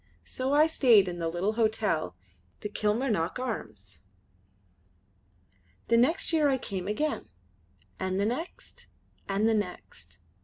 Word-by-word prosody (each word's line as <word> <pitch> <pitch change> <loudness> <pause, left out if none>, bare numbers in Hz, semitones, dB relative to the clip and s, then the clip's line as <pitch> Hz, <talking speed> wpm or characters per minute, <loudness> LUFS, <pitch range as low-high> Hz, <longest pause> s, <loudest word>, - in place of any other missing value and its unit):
So 260 +1 -3
I 295 +2 +6
stayed 240 -11 +5
in 175 -1 -4
the 165 - -1
little 180 +6 -1
hotel, 215 - 0 0.5
the 210 - -4
Kilmarnock 210 -4 0
Arms. 110 - -6 1.9
The 230 - +5
next 300 +8 +2
year 305 -3 +4
I 265 - +2
came 195 -6 -5
again, 295 +9 -2 0.7
and 185 0 -1
the 200 - +2
next, 260 +11 -5 0.4
and 200 +3 +2
the 225 - +3
next. 180 - -5
215 Hz, 125 wpm, -28 LUFS, 180-255 Hz, 1.9 s, I